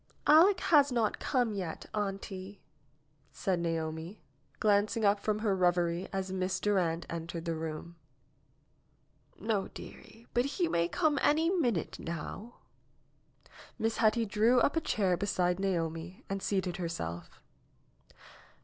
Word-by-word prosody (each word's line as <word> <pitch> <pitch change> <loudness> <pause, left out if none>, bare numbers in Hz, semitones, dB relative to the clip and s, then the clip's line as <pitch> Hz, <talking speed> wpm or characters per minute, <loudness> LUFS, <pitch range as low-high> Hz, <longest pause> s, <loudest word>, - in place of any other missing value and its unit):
'^Aleck 355 +6 +6
has 290 -4 +5
not 230 -3 0
come 245 -5 0
yet, 185 -5 -5
auntie," 195 -1 -4 0.7
said 185 -3 -1
Naomi, 165 +2 -3 0.4
glanc 205 +1 +2
ing 220 - +1
up 200 0 +4
from 210 +1 0
her 215 -2 +1
reverie 175 0 +1
as 190 -1 -3
Miss 185 0 -1
Durand 175 -5 +1
entered 165 0 -5
the 165 - -1
room. 160 +1 -6 1.4
^^No, 210 -3 -1
dearie, 230 +1 -12
but 245 +1 +2
he 355 -3 +2
may 170 - +1
come 300 - +1
any 320 +4 +3
minute 245 - 0
now." 195 +7 -6 1.2
Miss 225 -1 -1
Hetty 225 +1 +3
drew 220 +5 +3
up 280 - +2
a 325 - +2
chair 195 - +1
beside 180 -2 0
Naomi 170 -2 -2
and 195 0 -3
seated 190 -2 -1
herself. 85 - -5
195 Hz, 130 wpm, -31 LUFS, 170-225 Hz, 1.4 s, ^Aleck